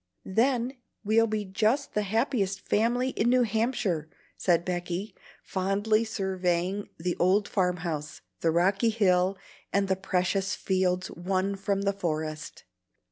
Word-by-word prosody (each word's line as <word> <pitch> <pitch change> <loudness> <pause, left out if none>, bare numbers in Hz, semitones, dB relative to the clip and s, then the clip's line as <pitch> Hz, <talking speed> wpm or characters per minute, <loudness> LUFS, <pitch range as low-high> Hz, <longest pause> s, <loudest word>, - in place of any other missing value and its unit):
Then 245 +5 +1 0.3
we'll 225 +2 +3
be 215 -1 -2
just 220 +9 0
the 210 - +1
happiest 210 -2 0
family 240 +4 +2
in 235 -2 +1
New 250 0 +4
Hampshire," 215 - 0 0.3
said 175 -2 +2
Becky, 180 +3 -3 0.3
fondly 205 +4 +1
surveying 190 -2 -1
the 175 +2 -2
old 195 +3 +3
farm 180 -2 +1
house, 150 -3 -4 0.2
the 165 - +1
rocky 195 +7 +3
hill, 190 -3 +2 0.3
and 200 0 +2
the 190 - +2
precious 190 +1 0
fields 185 -1 0
won 190 +3 -1
from 195 0 -1
the 200 0 +1
forest. 155 -5 -4
195 Hz, 135 wpm, -28 LUFS, 180-220 Hz, 0.3 s, New